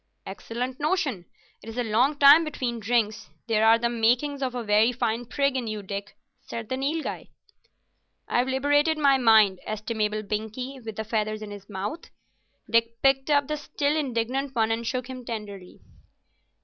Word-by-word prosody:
"Excellent 250 +3 -5
notion. 295 - -1 0.4
It 225 - -10
is 225 - -8
a 245 - +1
long 245 +7 +2
time 285 +3 +8
between 255 -6 -3
drinks. 220 0 0 0.2
There 220 -2 +1
are 225 +1 +7
the 235 +1 0
makings 240 +5 +1
of 255 -2 -2
a 245 - -3
very 215 +2 +4
fine 235 -1 -2
prig 275 +1 0
in 250 -3 -2
you, 215 -1 -4
Dick," 200 +1 -6 0.2
said 225 -2 -7
the 260 - -1
Nilghai. 290 +4 -3 1.0
"I've 245 +1 +1
liberated 290 +4 +2
my 280 -3 +4
mind, 215 -6 +5
estimable 215 0 -2
Binkie, 220 +6 -5
with 220 -1 -7
the 220 - -3
feathers 215 -1 -2
in 210 - -8
his 205 0 -11
mouth." 205 - -5 0.6
Dick 230 0 +1
picked 270 +1 +3
up 285 -2 +3
the 305 - -2
still 290 0 -1
indignant 265 -1 -2
one 225 -1 +2
and 230 0 -2
shook 250 0 -2
him 255 -1 -8
tenderly. 205 -5 -8
235 Hz, 170 wpm, -26 LUFS, 215-270 Hz, 1.0 s, time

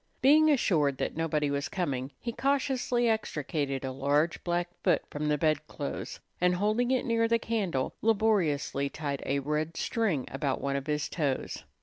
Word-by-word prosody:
Being 310 +3 +6
assured 155 - +2
that - - -2
nobody 150 -2 0
was 140 0 -2
coming, 135 -8 -2
he 235 - -3
cautiously 260 -2 +1
extricated 145 - -1
a 130 - -2
large 145 +5 +1
black 175 0 0
foot - - +3
from 150 +1 -2
the 150 0 +2
bedclothes, 155 -1 -2 0.2
and, 180 0 +4
holding 215 +6 +1
it 260 -1 +1
near 230 -1 +2
the 230 0 +3
candle, 200 -13 -1
laboriously 195 -11 +1
tied 140 -2 -4
a 140 - +1
red 150 +3 -2
string 200 - 0
about 135 0 -1
one 140 0 -1
of 140 +1 -3
his 150 -1 0
toes. 145 -6 -2
155 Hz, 160 wpm, -29 LUFS, 140-225 Hz, 0.2 s, Being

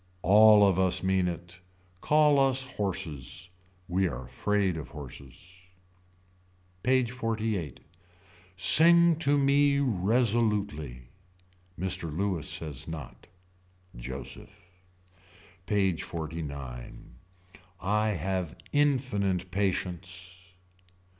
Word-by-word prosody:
All 105 +1 +7
of 95 -2 +2
us 95 -1 +1
mean 95 -1 +2
it. 85 +1 -7 0.4
Call 150 -1 +4
us 135 -1 +3
horses. 90 - -4 0.4
We 95 +1 +1
are 65 -5 -6
afraid 100 +7 0
of 80 -3 -7
horses. 75 +5 -11 1.2
PAGE 130 0 +2
XLVIII. 110 - -2 0.8
Sing 170 - +6
to 145 -3 +2
me 140 0 +3
resolutely. 105 - 0 0.8
Mr. 90 -3 -2
Louis 90 -1 -2
says 75 -6 -5
not. 80 -6 -9 0.7
Joseph. 95 - -8 1.0
PAGE 95 -5 +1
XLIX. 70 -7 -6 0.8
I 105 +3 0
have 95 -4 -2 0.2
infinite 120 -11 0
patience. 90 -1 -4
95 Hz, 85 wpm, -28 LUFS, 85-115 Hz, 1.2 s, All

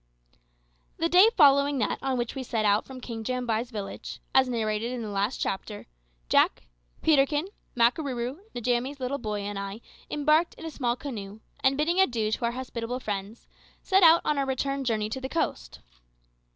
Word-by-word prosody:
The 330 - 0
day 370 +6 +7
following 280 -2 +5
that 220 - -1
on 265 -1 -1
which 240 -1 -2
we 270 - -5
set 230 -3 -1
out 205 +1 +3
from 260 -1 -9
King 230 -2 -6
Jambai's 245 -1 -1
village, 210 -5 -6
as 260 -1 +4
narrated 225 -1 -1
in 250 -2 -4
the 215 - -5
last 200 +5 -1
chapter, 205 +2 -4 0.4
Jack, - - +3 0.4
Peterkin, 295 +3 +3 0.3
Makarooroo, 250 +2 +1 0.2
Njamie's 245 +3 -1
little 260 +2 -2
boy, 210 -3 -3
and 200 0 -4
I 200 +2 -5 0.3
embarked 305 +3 +2
in 325 - -10
a 320 - -5
small 240 -5 -1
canoe, 215 -7 -7 0.2
and 265 +1 +3
bidding 335 +5 +1
adieu 235 - +2
to 235 - -1
our 235 - 0
hospitable 245 -1 -4
friends, 205 -1 -5 0.4
set 385 0 +3
out 335 -1 +7
on 300 -2 +1
our 275 - +1
return 275 +1 -1
journey 220 -4 0
to 260 +5 -5
the 265 - -4
coast. 60 - -3
250 Hz, 175 wpm, -27 LUFS, 220-280 Hz, 0.4 s, day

